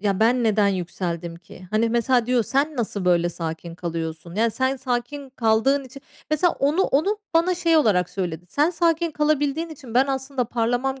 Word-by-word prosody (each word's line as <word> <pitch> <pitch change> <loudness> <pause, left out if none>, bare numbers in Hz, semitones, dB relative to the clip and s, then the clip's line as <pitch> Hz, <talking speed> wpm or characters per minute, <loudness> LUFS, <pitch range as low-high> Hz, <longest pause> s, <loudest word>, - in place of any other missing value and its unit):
ya, 200 0 0
ben 240 +2 +3
neden 210 -2 +3
yükseldim 175 -2 -3
ki? 185 +1 -14
Hani, 220 +2 +2
mesela 240 0 +2
diyor, 250 -2 +2
"Sen 280 +7 0
nasıl 210 -5 -2
böyle 175 -1 +3
sakin 165 0 -6
kalıyorsun?" 165 -1 -5
Yani 225 +2 +2
sen 260 +4 0
sakin 260 +2 -3
kaldığın 255 +3 +2
içi 265 +2 -12 0.3
Mesela 320 +3 +3
onu 300 +7 +2
onu 395 +9 +1 0.2
bana 350 +2 +3
şey 335 -2 +2
olarak 200 - +3
söyledi. 175 -3 -4
"Sen 300 - +2
sakin 335 -1 +1
kalabildiğin 300 +1 0
için 265 -7 -11
ben 265 +2 +4
aslında 265 -1 -2
parlamam 245 +3 -1
245 Hz, 175 wpm, -23 LUFS, 190-285 Hz, 0.3 s, ben